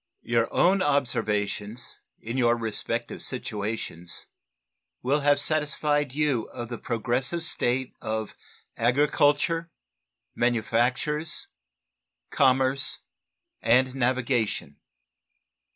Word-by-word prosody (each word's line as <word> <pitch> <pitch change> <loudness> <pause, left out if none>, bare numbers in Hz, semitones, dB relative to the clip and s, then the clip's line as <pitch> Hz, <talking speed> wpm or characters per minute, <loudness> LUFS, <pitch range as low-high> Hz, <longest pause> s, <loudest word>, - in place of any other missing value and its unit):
Your 115 -1 +1
own 190 +2 +3
observations 110 - -1 0.2
in 115 +2 -6
your 120 -2 +3
respective 115 +1 -3
situations 105 -8 -4 0.8
will 140 +4 +2
have 145 0 +3
satisfied 150 -1 +1
you 140 -5 +1
of 120 -2 -7
the 120 - -5
progressive 125 +7 -1
state 130 -4 +1
of 110 -1 -3 0.4
agriculture, 145 +6 +2 0.6
manufactures, 125 +6 0 0.8
commerce, 130 0 +2 0.6
and 125 +3 +3
navigation. 125 -3 0
125 Hz, 80 wpm, -26 LUFS, 115-145 Hz, 0.8 s, own